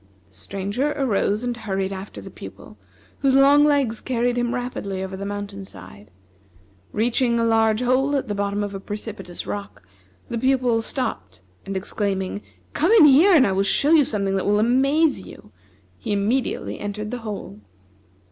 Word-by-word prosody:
The - - -27
Stranger 200 +10 -3
arose 220 -5 0
and 245 -1 -2
hurried 195 -4 -3
after 190 +1 -8
the - - -10
Pupil, - - -11 0.4
whose 270 -2 +2
long 280 +2 +6
legs 280 -7 +2
carried 245 -1 0
him 240 0 -1
rapidly 200 -6 -4
over 190 0 -5
the 200 +1 -5
mountain 205 -1 -6
side. 100 - -13 0.8
Reaching 235 +2 +1
a - - +1
large 225 0 +2
hole 265 +3 +2
at 275 -2 -1
the 205 - -2
bottom 200 0 -1
of 205 -1 -5
a 195 - -5
precipitous 200 -3 -7
rock, 100 -1 -6 0.4
the 235 - -3
Pupil 255 -3 +2
stopped, 95 - -4 0.2
and 195 0 -3
exclaiming: 195 0 -3 0.3
"Come 330 +7 +1
in 425 -9 +8
here 315 +7 +6
and 270 -5 +6
I 195 - +1
will 190 +1 +1
show 275 +9 +2
you 320 -3 +6
something 200 -6 -1
that 190 - -2
will 205 0 +3
amaze 275 +8 +2
you!" - - -14 0.5
he 225 - -5
immediately 220 +6 -1
entered 210 +1 -5
the 250 - -4
hole. 205 - -7
220 Hz, 170 wpm, -22 LUFS, 195-260 Hz, 0.8 s, in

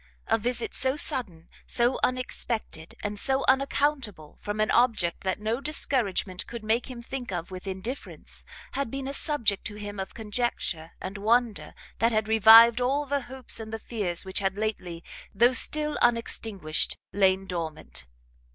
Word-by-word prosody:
A - - +2
visit 240 +2 -1
so 260 +1 +1
sudden, 230 - -3 0.2
so 240 +1 +1
unexpected, 235 -9 -2
and 205 0 -3
so 270 +3 +1
unaccountable, 265 - 0
from 205 +1 -4
an 215 - +2
object 225 -8 +2
that 190 - -1
no 220 +4 -2
discouragement 225 -11 0
could 235 -2 -7
make 225 +4 0
him 240 -2 -8
think 250 -2 -6
of 175 0 -4
with 185 +1 -8
indifference, 195 +8 -6 0.3
had 275 -3 -2
been 270 +2 -5
a 275 - -4
subject 235 -10 0
to 210 - -4
him 205 -1 -7
of 190 - -6
conjecture 210 -7 -3
and 195 +2 -6
wonder 230 +1 +1 0.2
that 230 +2 +3
had 215 -1 0
revived 225 +2 +8
all 275 +4 +1
the 285 0 -1
hopes 260 -1 -4
and 220 -1 -7
the 225 - -3
fears 200 -7 -3
which 190 - -2
had 195 0 -1
lately, 180 -6 -3 0.3
though 240 +5 +5
still 300 +3 +3
unextinguished, 225 -8 +1 0.2
lain 195 -1 +3
dormant. 155 - -3
220 Hz, 160 wpm, -27 LUFS, 195-250 Hz, 0.3 s, revived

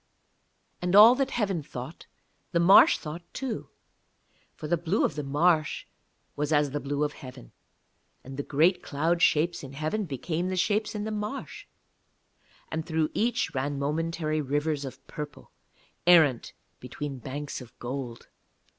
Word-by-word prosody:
And 180 +1 +1
all 215 +4 +10
that 270 +1 0
heaven 200 - -1
thought, 135 +2 -9 0.5
the 170 - +3
marsh 180 +4 +7
thought 155 +3 -7
too; 260 -4 -4 0.9
for 155 - -7
the 175 - +2
blue 170 +5 0
of - - -1
the 150 - -4
marsh 155 +3 +1 0.5
was 150 +1 -2
as 145 -2 +3
the 145 - -2
blue 145 +1 -2
of 150 0 -1
heaven, 130 -1 -11 0.7
and 135 +1 -9
the 140 - -2
great 165 +6 +2
cloud 165 +4 0
shapes 165 +3 +3
in 135 -1 -9
heaven 155 +9 -2
became 160 +4 -3
the 185 - -2
shapes 210 +4 0
in 210 - -3
the 220 - -3
marsh, 210 +5 -5 1.0
and 160 0 -2
through 160 -2 0
each 240 +2 0
ran 140 +2 -2
momentary 155 +2 -1
rivers 145 +1 -1
of 135 0 -10
purple, 150 -1 -8 0.6
errant 155 -9 +5 0.3
between 135 +2 -6
banks 140 +3 -6
of 125 - -14
gold. 125 -1 -6
155 Hz, 150 wpm, -27 LUFS, 140-175 Hz, 1.0 s, all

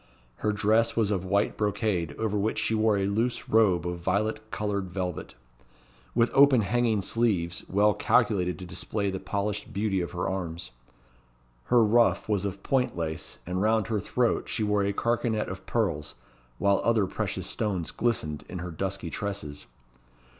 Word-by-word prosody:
Her 105 - 0
dress 110 +2 +2
was 110 -3 +2
of 95 -3 0
white 100 +2 +1
brocade, 105 -5 -1
over 110 -2 -1
which 105 +2 0
she - - 0
wore 110 -1 +3
a 95 - +1
loose 115 +5 -1
robe 95 -7 +3
of 90 0 -3
violet 110 +5 -1
coloured 100 -3 -2
velvet, 90 -2 -4 0.8
with 115 0 +3
open 135 -3 +6
hanging 110 -1 +1
sleeves, 95 -7 0
well 105 +2 +4
calculated 100 -8 +2
to 95 - -8
display 100 +3 -2
the 95 - -4
polished 100 +1 -3
beauty 100 -2 0
of 85 - -3
her 90 +1 -2
arms. 85 -2 -4 0.9
Her 120 - +5
ruff 115 +2 +3
was 100 -2 0
of 100 0 -5
point 130 -8 0
lace, 80 -2 -4
and 90 +1 -2
round 110 0 +2
her 110 -2 +1
throat 120 +4 0
she 110 - -1
wore 105 -1 +2
a 100 0 +1
carcanet 115 0 0
of 95 0 -8
pearls, 85 -10 -1 0.4
while 100 +5 +2
other 115 -3 +3
precious - - -3
stones 95 -6 -2
glistened 80 -11 -1
in 90 - -5
her 90 0 -5
dusky 95 0 -3
tresses. 100 -8 -5
100 Hz, 165 wpm, -27 LUFS, 90-110 Hz, 0.9 s, open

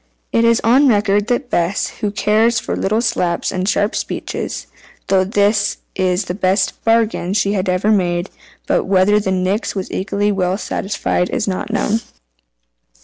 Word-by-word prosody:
It 230 - +2
is 230 0 +4
on 260 +5 +4
record 205 -2 +2
that 245 +1 -1
Bess 175 +3 0
(who 210 - -1
cared 215 +3 +2
little 215 +4 0
for - - -1
slaps 170 -1 0
and 185 +2 -1
sharp 205 0 +1
speeches) - - -4 0.4
thought 190 +1 +1
this 205 0 +2 0.2
the 180 0 -1
best 190 +2 +1
bargain 225 -5 +1
she 200 0 +1
had 190 -1 -1
ever 185 +4 +1
made. 175 -3 0 0.3
But - - +1
whether 195 +2 +3
the 200 - -2
Nix 190 +4 -1
was 190 -2 -4
equally 200 +2 -1
well 185 -1 0
satisfied 195 -3 -2
is 245 -5 -2
not 195 +3 -3
known. 220 -2 0
200 Hz, 155 wpm, -18 LUFS, 185-215 Hz, 0.4 s, is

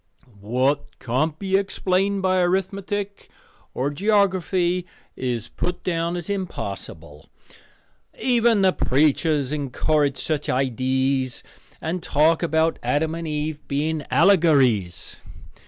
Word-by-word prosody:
"What 130 +7 -1
can't 145 +6 -1
be 190 +2 -1
explained 195 0 0
by 185 0 +2
arithmetic 195 +2 -2 0.5
or 135 +3 -1
geography 185 -1 +1 0.3
is 120 -3 -3
put 180 0 -4
down 170 -1 -1
as 175 - -6
impossible. 100 - -6 0.9
Even 235 -4 +3
the 185 -1 +4
preachers 145 0 +1
encourage 145 0 0
such 150 +2 -2
idees 130 0 0 0.4
and 170 +3 -3
talk 160 +2 +2
about 160 -1 +1
Adam 160 +2 0
and 165 0 -5
Eve 150 0 -3
being 150 +2 -1
allegories. 135 - +3
160 Hz, 105 wpm, -23 LUFS, 135-185 Hz, 0.9 s, the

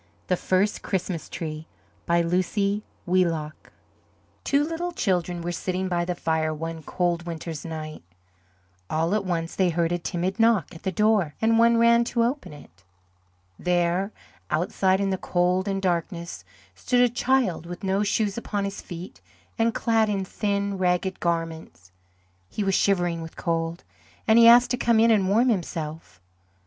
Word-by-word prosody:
THE 180 - +3
FIRST 190 +4 0
CHRISTMAS 180 -4 -3
TREE 155 -1 -6 0.4
BY 170 0 +3
LUCY 200 +4 0 0.2
WHEELOCK 165 -4 -1 0.7
Two 280 +1 +2
little 330 +3 -3
children 180 - -1
were 175 - -2
sitting 185 +2 -2
by 175 -1 0
the 180 0 -2
fire 160 -2 0
one 165 +1 -5
cold 175 +1 -1
winter's 165 -2 -5
night. 155 -2 -6 0.9
All 165 +4 0
at 215 -1 +1
once 165 -2 -2
they 185 -2 +2
heard 170 0 0
a 175 - 0
timid 180 +4 -3
knock 225 -8 +3
at 165 - -11
the 190 - -2
door 205 -5 +2
and 225 0 +3
one 235 0 +5
ran 235 0 +5
to 235 0 +1
open 255 - -2
it. 95 - -15 0.8
There, 180 +3 +1 0.4
outside 190 0 +1
in 200 -1 0
the 190 - -1
cold 180 +2 +1
and 195 -1 -1
darkness, 170 - -2 0.3
stood 245 - +1
a 245 - +6
child 240 -8 0
with 175 +2 -8
no 195 +1 +1
shoes 210 +1 0
upon 205 -3 -3
his 195 - -5
feet 175 0 -9 0.4
and 230 +1 +3
clad 225 -1 +1
in 195 -2 -1
thin, 200 0 -2
ragged 180 +1 0
garments. 165 - -3 0.6
He 210 - -3
was 195 -1 +1
shivering 175 -4 +1
with 165 0 -9
cold, 165 0 -2 0.4
and 220 +1 +6
he 230 - +8
asked 240 +1 +7
to 250 - +1
come 235 -2 +3
in 230 +1 +5
and 195 -4 +3
warm 235 +6 +3
himself. 160 - -4
185 Hz, 160 wpm, -25 LUFS, 170-210 Hz, 0.9 s, he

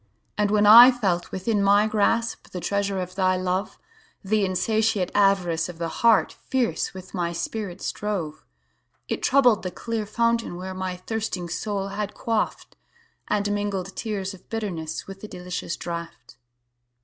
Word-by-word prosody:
And 210 -1 +1
when 210 0 +3
I 235 +4 +11
felt 195 -9 -1
within 200 +2 0
my 200 +1 +5
grasp, 225 +2 0
The 180 - -6
treasure 200 +1 -1
of 180 0 -5
thy 185 -1 +2
love; 185 +2 -2 0.5
The 210 +1 +1
insatiate 210 0 +1
avarice 180 -5 +2
of 175 - -8
the 165 0 -3
heart 230 -1 +5 0.2
Fierce 250 -6 -1
with 185 0 -10
my 170 -2 -1
spirit 185 +2 -4
strove.It 150 - -6
troubled 250 -5 +4
the 185 - -3
clear 225 +2 -4
fountain 230 -2 0
where 185 +1 -6
My 185 -1 -4
thirsting 185 -3 -4
soul 200 +2 -3
had 205 +1 -4
quaffed, 225 -2 -2 0.5
And 205 0 0
mingled 200 -2 -2
tears 200 -3 -3
of 190 - -16
bitterness 175 -8 -4
With 195 0 -10
the 215 - -7
delicious 180 -2 -5
draught. 170 -5 -7
195 Hz, 150 wpm, -24 LUFS, 180-215 Hz, 0.5 s, I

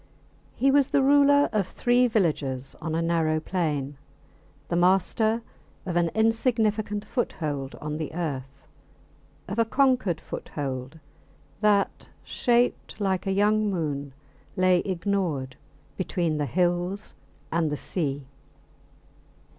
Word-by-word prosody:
He 270 +1 +3
was 280 -1 +4
the 275 - +2
ruler 285 +1 +5
of 205 -4 +1
three 245 +4 +2
villages 145 - -1
on 160 0 -2
a 165 - 0
narrow 165 -2 +1
plain; 150 -5 -2 0.7
the 170 - -1
master 195 +6 +2 0.4
of 180 -2 -3
an 170 -1 +2
insignificant 220 -2 +1
foothold 145 - -3
on 150 0 -5
the 155 -1 -4
earth 135 -5 -5 0.8
of 200 +5 -3
a - - +6
conquered 255 - +2
foothold 135 0 -5 0.6
that, 205 -2 +1
shaped 240 -2 0
like 190 -2 -1
a - - +1
young 210 +2 +2
moon, 145 -7 -3 0.4
lay 185 -1 +4
ignored 175 -8 -2 0.4
between 170 -4 -1
the 145 - 0
hills 175 - -1 0.4
and 160 -2 +1
the 150 - -2
sea. 145 -6 -2
180 Hz, 115 wpm, -26 LUFS, 150-215 Hz, 0.8 s, a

